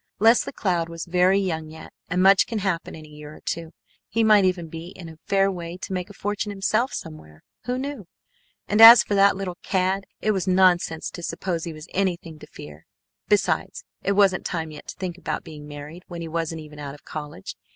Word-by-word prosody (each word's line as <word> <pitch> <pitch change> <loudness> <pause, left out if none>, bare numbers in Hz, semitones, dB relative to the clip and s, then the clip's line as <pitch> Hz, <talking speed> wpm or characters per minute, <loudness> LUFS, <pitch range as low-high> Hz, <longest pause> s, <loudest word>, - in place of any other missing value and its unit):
Leslie 225 +3 +4
Cloud 175 -9 -1
was 165 0 -6
very 180 +2 +3
young 160 -5 -2
yet, 160 +1 -12 0.2
and 180 +1 +1
much 195 0 +6
can 230 - -3
happen 190 -5 -2
in 155 -1 -11
a - - -16
year 150 0 -11
or - - -14
two. 165 -1 -4 0.4
He 225 +2 +1
might 210 -3 +6
even 180 -2 0
be 165 +1 -8
in 175 - -9
a 160 -1 -12
fair 195 0 +3
way 175 -1 -6
to 190 - -6
make 180 0 -3
a - - -11
fortune 205 +1 -3
himself 215 +5 0
somewhere, 80 - -9 0.2
who 250 +1 -1
knew? 265 -7 -5 0.6
And 210 +2 +2
as 230 +1 +11
for - - -3
that 200 0 +5
little 190 -2 -5
cad, 190 0 0
it 215 - +1
was 190 -3 -2
nonsense 180 -3 +2
to 175 - -8
suppose 170 0 -3
he 170 - -4
was 155 +2 -11
anything 175 -5 -2
to - - -12
fear. 75 +1 -12 0.4
Besides, - - 0 0.2
it 200 - 0
wasn't 195 -2 +3
time 160 -3 -3
yet 150 - -11
to - - -7
think 180 -2 -5
about - - -4
being 150 -3 -10
married 150 +4 -9
when 170 -1 -7
he 165 - -5
wasn't 165 0 -3
even 150 -1 -12
out 140 -1 -6
of 145 - -19
college. 155 +5 -7
180 Hz, 215 wpm, -24 LUFS, 160-195 Hz, 0.6 s, as